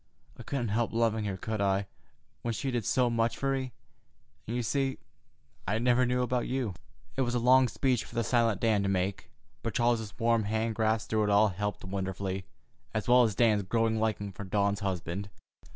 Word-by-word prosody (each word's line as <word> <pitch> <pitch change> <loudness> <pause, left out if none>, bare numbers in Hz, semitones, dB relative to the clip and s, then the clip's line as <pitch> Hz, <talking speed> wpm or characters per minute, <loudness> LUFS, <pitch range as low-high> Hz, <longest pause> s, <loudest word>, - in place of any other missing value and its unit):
I - - -11
couldn't 125 -5 -2
help 115 +3 0
loving 110 -2 +1
her, 100 -2 -3
could 110 +2 -3
I, 100 0 +1 0.6
when 115 -1 -2
she 135 +5 -2
did 120 -4 -1
so 125 +4 +2
much 115 -1 0
for 135 0 0
me? 130 -1 -2 0.8
And, 115 - -3
you 120 - -1
see, 135 +3 0 0.7
I 105 - +1
never 125 +2 +3
knew 125 0 +1
about 125 -1 -1
you." 125 -6 -1 0.4
It 135 - 0
was 120 -1 0
a - - +3
long 130 +2 +5
speech 125 +1 0
for - - -13
the 115 - +1
silent 115 -2 +2
Dan 110 -3 +3
to 100 - 0
make, 95 0 -1 0.3
but - - -4
Charles's 115 -4 +1
warm 115 -2 +2
hand 110 +2 0
grasp 110 0 0
through 110 -1 +2
it - - 0
all 105 +1 +5
helped 105 +2 -4
wonderfully, 95 0 -3 0.5
as 110 - -1
well 125 +1 +7
as 110 -5 +2
Dan's 110 -3 +3
growing 110 +3 +1
liking 105 -2 -1
for 100 - -8
Dawn's 100 +1 0
husband. 95 0 -3
110 Hz, 200 wpm, -30 LUFS, 100-120 Hz, 0.8 s, well